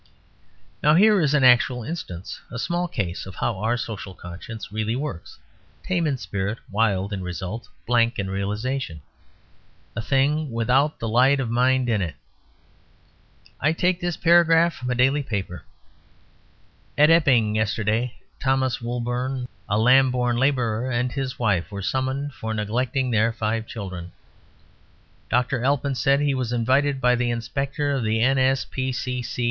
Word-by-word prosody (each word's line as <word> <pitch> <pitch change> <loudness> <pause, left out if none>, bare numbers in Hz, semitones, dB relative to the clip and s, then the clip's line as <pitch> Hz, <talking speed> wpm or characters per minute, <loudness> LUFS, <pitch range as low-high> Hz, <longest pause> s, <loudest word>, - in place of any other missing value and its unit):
Now 150 +1 +5
here 210 +1 +5
is 150 -1 +2
an 140 - +3
actual 125 -1 +4
instance, 100 - -6
a 115 - -7
small 175 +8 -1
case 95 - -4
of 95 - -9
how 110 -5 -2
our 115 +4 0
social 100 -5 -6
conscience 90 +6 -9
really 110 +2 -1
works: 135 - -6 0.5
tame 175 -3 0
in 140 -3 0
spirit, 100 -1 -3
wild 100 -2 +1
in 95 - -3
result, 95 +5 -5 0.2
blank 120 0 +2
in 100 - -2
realisation; 100 - -3 0.9
a 115 - -2
thing 145 +5 +1
without 125 +6 +1
the 115 - -4
light 130 +5 +4
of 125 -4 -2
mind 125 +1 +2
in 110 -4 +1
it. 85 -4 -3 1.4
I 155 +3 +2
take 180 +2 +1
this 175 -2 -2
paragraph 170 0 +5
from 125 - -6
a 125 - 0
daily 135 +4 +3
paper: 100 -8 -5 1.3
"At 150 +2 +6
Epping, 125 -10 +4
yesterday, 110 +2 0 0.2
Thomas 130 -2 0
Woolbourne, 125 +2 -3 0.2
a 105 - +2
Lambourne 125 0 +3
labourer, 125 -3 +1
and 125 0 0
his 135 -2 -4
wife 100 -7 0
were 100 -1 -6
summoned 130 +6 -2
for 110 -2 -4
neglecting 125 +4 -1
their 115 +1 +3
five 110 0 -2
children. 95 -6 -7 1.2
Dr. 125 0 +1
Alpin 140 +1 +1
said 135 +2 +2
he 145 -1 +1
was 130 -3 -2
invited 130 +4 +1
by 125 -1 +3
the 120 0 0
inspector 135 +5 -2
of 135 -4 -1
the 110 +1 +1
N. 130 +2 +3
125 Hz, 145 wpm, -23 LUFS, 110-135 Hz, 1.4 s, At